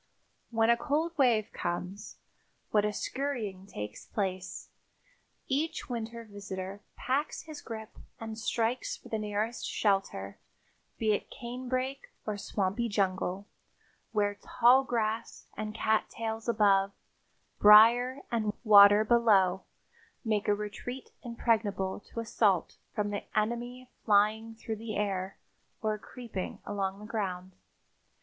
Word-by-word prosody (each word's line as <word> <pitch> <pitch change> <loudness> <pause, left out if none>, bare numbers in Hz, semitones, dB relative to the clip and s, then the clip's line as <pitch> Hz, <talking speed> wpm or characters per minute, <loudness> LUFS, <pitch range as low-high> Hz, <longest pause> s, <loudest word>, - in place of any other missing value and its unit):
When 225 0 +3
a 235 - +4
cold 300 +5 0
wave 235 -6 +3
comes, 180 +4 -4 0.5
what 210 -1 +3
a 210 - +1
scurrying 215 -6 -3
takes 105 - -7
place! 190 -3 -3 0.8
Each 290 +2 -1
winter 230 -1 -4
visitor 200 -2 -7
packs 275 +4 -1
his 310 -2 -9
grip 220 -1 -8 0.2
and 225 -1 -5
strikes 230 +2 -1
for - - -15
the 220 - -1
nearest 215 +2 -2
shelter, 195 - 0 0.6
be 220 -1 +2
it - - -3
canebrake 255 - -4
or 215 - -2
swampy 205 +3 -1
jungle, 195 -1 0 0.7
where 205 -2 +1
tall 250 +3 +5
grass 230 -2 -2
and 215 0 -5
cat 220 -1 +1
tails 225 0 -4
above, 200 -3 +3 0.7
briars 235 +6 +7
and 215 -3 0
water 205 -1 +8
below, 205 -6 +4 0.6
make 215 -2 0
a 205 - +4
retreat 210 +5 -6
impregnable 215 -5 0
to - - -5
assault 210 -5 +1 0.2
from 205 -1 -1
the 205 - -3
enemy 240 +3 -1 0.2
flying 220 +2 +3
through 225 0 -5
the 220 0 -5
air 195 -2 -2 0.5
or 215 -1 0
creeping 230 -5 -6
along 195 -1 -2
the 210 - -10
ground. 190 -4 -3
215 Hz, 120 wpm, -30 LUFS, 200-235 Hz, 0.8 s, water